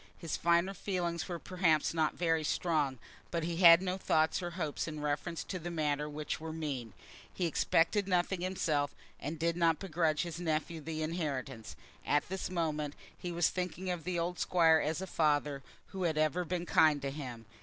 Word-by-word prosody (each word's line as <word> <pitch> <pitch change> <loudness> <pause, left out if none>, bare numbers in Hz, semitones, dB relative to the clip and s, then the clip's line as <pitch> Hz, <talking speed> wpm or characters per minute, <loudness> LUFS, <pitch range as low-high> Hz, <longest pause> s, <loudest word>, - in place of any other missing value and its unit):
His 165 -2 -3
finer 170 +3 +2
feelings 175 -3 -2
were 175 - -2
perhaps 170 -4 +1
not 160 -2 +1
very 165 -2 +1
strong, 150 -4 0 0.3
but 170 -1 -2
he 170 0 -2
had 170 0 +8
no 185 0 -2
thoughts 160 0 +2
or 175 - -3
hopes 155 -3 -2
in 155 -1 -5
reference 150 +3 -2
to 185 - -5
the 175 +1 -5
matter 150 -3 -1
which 150 0 -4
were 160 0 -5
mean. 140 -9 -4 0.4
He 180 - -2
expected 170 +4 +2
nothing 180 0 +1
himself, 155 -6 0 0.2
and 150 +4 -4
did 165 +1 0
not 165 -2 +3
begrudge 165 -4 0
his 170 -1 -5
nephew 160 -1 -1
the 155 +1 -3
inheritance. 140 -8 -3 0.3
At 145 +2 +1
this 190 0 -3
moment 155 -4 -2 0.2
he 175 - -5
was 170 -1 +2
thinking 185 0 -3
of 175 -3 -4
the 180 +2 -2
old 175 +1 -2
Squire 165 -3 +4
as 160 +5 -1
a - - -2
father 150 -5 +1 0.3
who 190 -2 -3
had 160 -2 0
ever 155 +3 +1
been 175 +1 -2
kind 155 -3 +4
to 140 - -1
him. 125 -6 -7
165 Hz, 185 wpm, -33 LUFS, 150-175 Hz, 0.4 s, had